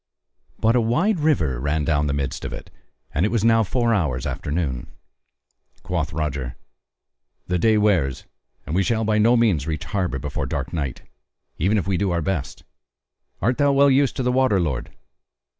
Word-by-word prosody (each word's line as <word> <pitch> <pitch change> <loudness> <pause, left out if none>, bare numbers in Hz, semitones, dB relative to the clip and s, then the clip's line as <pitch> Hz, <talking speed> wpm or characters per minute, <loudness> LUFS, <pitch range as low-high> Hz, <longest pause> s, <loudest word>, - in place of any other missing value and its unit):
But 115 +2 +2
a 125 - +4
wide 170 - +1
river 85 - +1
ran 75 +3 -1
down 75 -1 +1
the 70 - -1
midst 70 -1 -3
of - - -4
it; - - -9 0.4
and 80 - +1
it 105 - +2
was 115 -2 0
now 115 0 +5
four 115 +2 +1
hours 75 - 0
after - - -4
noon. 75 -6 -2 1.0
Quoth 85 -4 -2
Roger: 70 -5 -3 0.9
"The 90 -1 -1
day 110 +4 +4
wears 90 - +1 0.4
and 75 - -5
we 95 - +3
shall 110 +3 0
by 110 0 +1
no 115 +3 +5
means 95 -11 +2
reach 80 -1 -3
harbour 90 -3 -2
before 70 +1 -4
dark - - -4
night, 70 -6 -3 0.6
even 100 +7 +2
if 95 - -2
we 95 -2 +1
do 100 +1 0
our 85 -2 0
best: 95 -5 -3 0.8
art 125 +4 +1
thou 145 -1 +4
well 140 0 +5
used 135 0 +3
to 130 - -2
the 125 - +1
water, 130 -6 +3
lord?" 70 -8 -2
95 Hz, 185 wpm, -22 LUFS, 75-115 Hz, 1.0 s, now